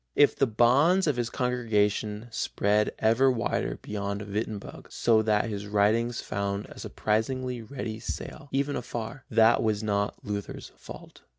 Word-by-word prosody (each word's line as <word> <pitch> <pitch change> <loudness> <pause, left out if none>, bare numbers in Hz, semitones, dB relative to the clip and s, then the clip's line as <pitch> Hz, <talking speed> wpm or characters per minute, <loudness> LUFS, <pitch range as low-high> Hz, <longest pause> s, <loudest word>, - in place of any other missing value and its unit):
If 145 - +5
the 135 - +2
bounds 135 - +4
of 150 -4 +1
his 120 -1 -1
congregation 110 -3 0
spread 105 -1 +1
ever 115 +5 +4
wider 120 -3 -1
beyond 100 0 -3
Wittenberg, 105 0 -5
so 115 -2 +3
that 105 -1 +1
his 105 -2 -5
writings 110 +3 +2
found 100 0 -3
a - - -12
surprisingly 125 +3 -1
ready 115 -2 -6
sale, 145 +5 -6
even 140 +1 0
afar, 120 +2 -5
that 115 +1 +5
was 110 -1 0
not 100 -1 0
Luther's 100 -1 -5
fault. - - -12
110 Hz, 140 wpm, -27 LUFS, 105-125 Hz, -, If